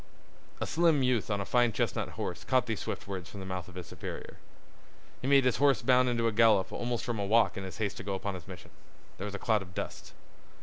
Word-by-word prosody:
A - - -1
slim 160 -4 +3
youth 125 -4 +1
on 100 -1 0
a - - -3
fine 120 +1 +3
chestnut - - -1
horse - - -4
caught 130 -1 +2
these 115 -4 -2
swift - - -5
words 95 -3 -5
from 100 - -9
the 95 - -6
mouth 95 -2 -4
of 90 - -13
his 90 -2 -6
superior. - - -8 0.8
He 130 - -3
made 140 -1 +5
his 125 - +3
horse 140 0 +3
bound 125 -1 +4
into 115 -1 0
a - - +2
gallop 110 -3 +4
almost 120 -1 -2
from 120 -4 -2
a 100 - -1
walk 115 +2 +4
in 95 - -5
his 95 - -7
haste 105 -3 -2
to - - -6
go 100 0 -2
upon 100 +1 -3
his 90 -3 -9
mission. 90 -2 -10 0.5
There 95 - -3
was 100 -1 -5
a - - -2
cloud 110 -1 +1
of 90 -1 -11
dust. - - -6
110 Hz, 250 wpm, -30 LUFS, 95-125 Hz, 0.8 s, made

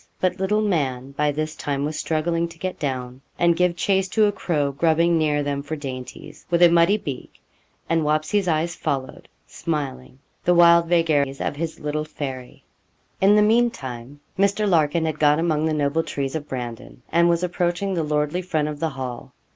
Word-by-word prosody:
But 185 0 0
'little 210 +3 +1
man' 135 -9 -1
by 150 +1 0
this 155 +2 -3
time 140 -1 -2
was 155 +1 -3
struggling 165 +2 -1
to 170 0 -14
get 185 +2 -5
down 130 -2 -4 0.2
and 170 -1 +3
give 180 0 +2
chase 190 +1 +1
to 215 +3 +3
a 205 - +2
crow 155 -8 -1
grubbing 165 +3 +2
near 150 -2 +1
them 140 -1 -2
for 145 +3 -5
dainties, 135 +1 -8
with 175 0 +3
a 175 - +8
muddy 170 +4 +4
beak, 140 -10 -7 0.5
and 165 0 +1
'Wapsie's' 155 +6 +1
eyes 165 +1 0
followed, 130 -1 -4 0.2
smiling, 130 +4 -4 0.3
the 175 - +3
wild 170 -1 +6
vagaries 155 -5 +1
of - - -2
his 160 +2 -4
little 150 +1 -2
Fairy. 135 -4 -7 0.6
In 200 +2 +6
the 210 - +5
mean 235 +3 +4
time 130 - -9 0.2
Mr. 200 +2 +2
Larkin 160 -2 +2
had 155 -1 -3
got 150 0 +4
among 160 -2 +1
the - - 0
noble 150 +1 +1
trees 140 -4 -4
of 155 -2 -4
Brandon, 120 -1 -7
and 170 +1 +4
was 170 +1 +1
approaching 180 +2 -1
the 170 - 0
lordly 150 +3 -1
front 155 -4 -1
of 150 -1 -6
the 165 - 0
Hall. 130 -4 -7
155 Hz, 185 wpm, -23 LUFS, 140-175 Hz, 0.6 s, a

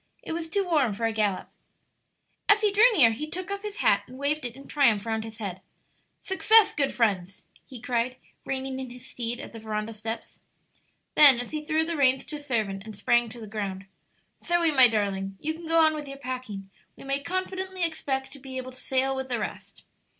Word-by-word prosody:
It - - -6
was 325 0 -4
too 395 +3 0
warm 290 - +2
for 230 +2 -2
a 225 - 0
gallop. 210 -4 0 1.0
As 415 +1 +6
he 420 -1 +3
drew 440 +5 +6
near 235 -7 +7
he 300 +8 -5
took 370 +4 -5
off 400 0 -3
his 420 -1 -6
hat 200 0 +5
and 255 - -12
waved 285 +1 -1
it 235 - -11
in 275 +1 -13
triumph 235 -8 +3
round 220 -1 -1
his 220 -1 -9
head. 190 -5 -5 0.6
"Success, 435 +3 +5
good 280 -2 0
friends!" 195 -5 -1 0.2
he 255 -3 -10
cried, 245 +1 -1 0.3
reining 265 0 -3
in 260 -1 -6
his 245 0 -11
steed 240 0 -4
at - - -8
the 225 - -8
veranda 215 0 -4
steps. 225 +2 -6 0.7
Then, 280 -5 +8
as 245 - -5
he 305 -1 -4
threw 315 +1 +1
the 335 0 -2
reins 265 -2 +3
to 300 - -6
a - - -9
servant 220 -9 -2
and 220 -1 -9
sprang 240 +3 +2
to 240 +2 -10
the 220 - -8
ground, 200 -3 -5 0.6
"Zoe, 345 -2 +2
my 260 -4 +8
darling, 195 -3 -2
you 315 +1 -2
can 330 +1 -10
go 330 0 +4
on 315 -1 +5
with 300 -2 -5
your 275 0 -8
packing; 250 -7 -6 0.2
we - - -13
may 275 +1 -2
confidently 370 +2 -3
expect 270 -5 -2
to 280 - -10
be 260 -1 -7
able 255 0 -5
to 255 - -12
sail 265 +1 0
with 265 0 -4
the 245 - 0
rest." 215 - -7
260 Hz, 215 wpm, -27 LUFS, 225-310 Hz, 1.0 s, Then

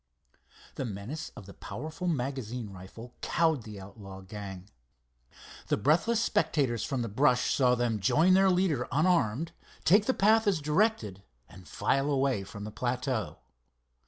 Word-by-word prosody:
The - - -2
menace 120 +9 -5
of 100 - -10
the 100 - -11
powerful 155 - -6
magazine 125 - -3
rifle 95 +6 -11
cowed 160 -4 +1
the 105 -2 -9
outlaw 95 0 -10
gang. 95 -1 -8 1.0
The - - +1
breathless 165 - +2
spectators 145 - +1
from 130 -3 -2
the - - -3
brush 125 +3 +2
saw 125 -2 +3
them 120 -3 0
join 160 - +4
their 190 +1 +5
leader 180 -9 +1
unarmed, 160 -2 +1 0.3
take 205 +5 +5
the 260 - +2
path 220 +2 +4
as 190 -5 +2
directed, 150 - 0 0.3
and 95 -1 -15
file 135 - 0
away 135 -7 +1
from 100 +1 -9
the 105 - -6
plateau. 125 0 -2
125 Hz, 145 wpm, -29 LUFS, 105-160 Hz, 1.0 s, their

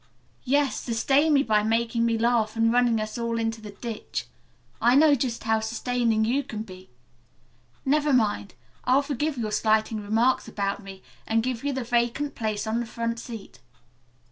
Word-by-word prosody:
"Yes, 280 +1 +2
sustain 270 +6 +2
me 280 -1 +4
by 215 -2 +2
making 230 +2 +1
me 230 -1 +1
laugh 230 -1 +1
and 225 0 +2
running 240 -2 +3
us 215 +2 -4
all 235 0 -1
into 225 0 -2
the 215 - -8
ditch. 215 +2 -5 0.6
I 240 +3 +5
know 300 +1 +6
just 245 -3 -1
how 220 0 +2
sustaining 230 0 0
you 255 +5 +1
can 220 -6 -6
be. 185 -3 -13 1.0
Never 295 +2 +2
mind. 210 -6 +1 0.3
I'll 260 +3 +3
forgive 290 +1 -2
your 220 -3 -2
slighting 215 0 +1
remarks 225 +5 +1
about 200 0 -2
me, 195 -1 -11 0.2
and 225 0 +2
give 250 -1 -3
you 285 - 0
the 265 -2 -3
vacant 240 +4 0
place 215 -2 -2
on 220 +2 -1
the 240 - -3
front 230 0 -3
seat. 225 - -9
230 Hz, 170 wpm, -26 LUFS, 220-250 Hz, 1.0 s, know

